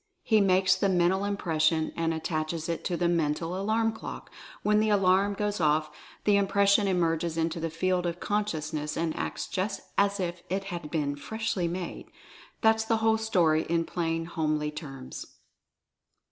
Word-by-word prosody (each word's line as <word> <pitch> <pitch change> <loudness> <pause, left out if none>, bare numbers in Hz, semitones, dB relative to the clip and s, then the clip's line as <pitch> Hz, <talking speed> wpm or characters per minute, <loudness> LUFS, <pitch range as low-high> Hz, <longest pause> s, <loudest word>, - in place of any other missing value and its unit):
He 220 -2 +4
makes 185 -1 +4
the 195 +1 +1
Mental 185 +1 +2
Im 200 0 -1
pression 160 -2 +1
and 165 -1 0
attaches 160 0 -2
it 170 -1 -3
to 175 - -1
the 175 - +1
Mental 165 0 0
Alarm 220 +4 +1
Clock 220 - -8 0.2
— - - -19
when 210 0 +3
the 215 0 +2
Alarm 195 0 +3
goes 205 -2 -2
off 155 0 +2 0.3
the 205 -1 +4
Impression 200 +1 +3
emerges 165 -3 0
into 165 0 -1
the 165 0 -2
field 180 +2 0
of 170 0 -4
consciousness 155 -7 -2
and 165 -1 -1
acts - - -3
just 200 +2 -2 0.2
as 200 0 +2
if 175 -1 -3
it 195 +2 -1
had 170 -3 -5
been 145 -3 -1
freshly 215 +2 -2
made. 175 +1 -5 0.5
That's 220 -1 +4
the 225 0 +1
whole 220 0 +2
story 170 -8 +3
in 165 0 +1
plain 165 -1 -2
homely 155 -2 -1
terms. 135 -4 -8
175 Hz, 170 wpm, -28 LUFS, 160-200 Hz, 0.5 s, He